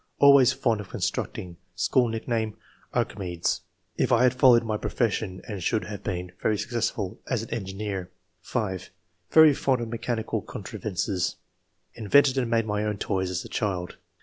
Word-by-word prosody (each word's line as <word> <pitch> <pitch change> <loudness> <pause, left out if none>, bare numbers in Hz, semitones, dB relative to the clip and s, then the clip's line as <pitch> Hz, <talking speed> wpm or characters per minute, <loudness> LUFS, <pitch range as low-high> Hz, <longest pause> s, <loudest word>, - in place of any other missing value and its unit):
'' - - -46
Always 140 -3 +7
fond 115 -5 0
of 100 - -11
constructing; 85 -2 -3 0.2
school 105 +8 +2
nickname, 110 -1 -2 0.3
'Archimedes.' 90 -4 -1 0.4
If - - +1
I 120 +1 +5
had 125 - +5
followed 125 -2 +6
my 110 -2 -1
profession 105 -4 -1 0.2
should 105 +4 0
probably 90 - -8
have 100 - -7
been 90 -2 -3
[very 110 - +1
successful 110 -3 -2
as] 120 -4 0
an 115 - -10
engineer." 95 -3 -4 0.3
5. 95 -7 -3 0.4
"Very 160 -2 +8
fond 135 -2 +1
of 120 -1 -4
mechanical 115 -1 -2
contrivances. 95 -2 -3 0.6
Invented 130 +5 +4
and 120 -3 -1
made 115 -1 +2
my 105 -1 -1
own 105 -1 -1
toys 95 -2 -1
as 90 -1 -3
a - - -6
child. 95 -4 -2
110 Hz, 160 wpm, -26 LUFS, 95-120 Hz, 0.6 s, Very